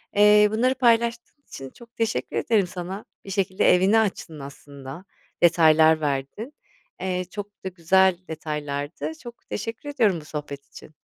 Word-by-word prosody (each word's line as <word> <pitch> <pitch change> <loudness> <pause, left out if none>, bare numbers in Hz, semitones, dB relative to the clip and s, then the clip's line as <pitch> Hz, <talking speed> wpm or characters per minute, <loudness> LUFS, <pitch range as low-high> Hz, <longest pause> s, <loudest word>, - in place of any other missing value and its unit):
Eee, 210 0 +6
bunları 255 +4 +1
paylaştığın 235 +3 +1
için 135 -1 -9
çok 235 - -18
teşekkür 225 -1 -2
ederim 210 -5 +1
sana. 185 +3 -7 0.2
Bir - - -9
şekilde 190 -2 +2
evini 195 +5 +3
açtın 180 -7 -3
aslında, 140 +4 -10 0.4
detaylar 160 -1 +5
verdin. 145 - -3 0.5
Eee, 180 -1 -2
çok 205 -1 -9
da - - -1
güzel 185 +1 +3
detaylardı. 150 - -4
Çok 240 -1 -12
teşekkür 230 +6 -5
ediyorum 210 - +1
bu - - -16
sohbet 145 -2 -7
için. - - -14
185 Hz, 140 wpm, -24 LUFS, 155-220 Hz, 0.5 s, Eee